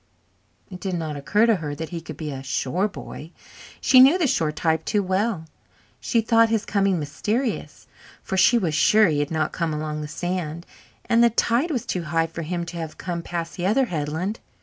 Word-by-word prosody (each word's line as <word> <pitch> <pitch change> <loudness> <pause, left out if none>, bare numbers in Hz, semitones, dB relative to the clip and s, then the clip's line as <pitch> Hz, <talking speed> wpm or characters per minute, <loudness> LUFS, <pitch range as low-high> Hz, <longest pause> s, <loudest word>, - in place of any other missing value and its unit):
It 180 - -8
did 185 0 -3
not 160 -3 -3
occur 205 +10 +2
to 225 -3 +3
her 150 -3 -5
that 160 +1 -6
he 170 -2 -5
could - - -9
be 155 -2 -4
a 135 -1 -6
shore 135 +8 -1
boy 165 -5 -9 0.5
she 260 - +5
knew 270 +7 +8
the 350 - +1
shore 160 - +1
type 160 +1 0
too 205 -2 0
well. 190 -1 -1 0.5
She 230 - +1
thought 225 0 +4
his 225 -1 0
coming 195 -2 +1
mysterious, 210 - -3 0.4
for - - -3
she 195 +6 +5
was 175 -9 0
sure 210 +8 +5
he 150 -2 0
had 145 0 -1
not 160 -1 -1
come 165 -3 -2
along 150 0 -3
the 150 - -5
sand, 170 0 -4 0.4
and 235 0 +4
the 235 - +6
tide 235 +7 +1
was 255 -8 -2
too 180 -2 -3
high 165 +2 +1
for 165 +1 -7
him 170 +2 -3
to 170 0 -7
have 160 -2 -6
come 170 -1 -4
past 170 +1 -5
the 180 +1 -1
other 255 +6 +3
headland. 160 +8 -2
175 Hz, 210 wpm, -23 LUFS, 155-215 Hz, 0.5 s, knew